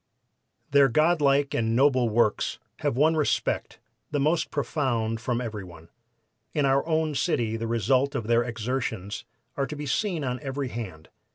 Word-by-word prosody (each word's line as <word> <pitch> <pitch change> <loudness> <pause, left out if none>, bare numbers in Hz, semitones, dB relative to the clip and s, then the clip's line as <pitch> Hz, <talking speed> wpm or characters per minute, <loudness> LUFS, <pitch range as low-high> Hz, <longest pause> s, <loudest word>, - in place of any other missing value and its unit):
"Their 140 -1 +6
God 155 +6 +3
like 140 0 +3
and 115 0 +1
noble 130 -2 +4
works 110 -1 +1 0.2
have 140 -4 -1
won 155 +3 +4
respect, 155 -2 0 0.3
the 145 - -1
most 155 +4 +1
profound 120 -7 -1
from 120 0 -1
every 110 -5 -4
one. 85 -2 -13 0.7
In 145 -2 +2
our 135 0 +3
own 160 -1 +1
city 120 -5 0
the 115 0 -3
result 130 +5 +1
of 115 - -2
their 115 +1 +3
exertions 115 -3 -3 0.3
are 140 -1 -1
to 150 - -6
be 150 0 -5
seen 175 +2 -1
on 125 -1 -2
every 135 0 -3
hand. 95 -10 -7
130 Hz, 165 wpm, -26 LUFS, 115-145 Hz, 0.7 s, Their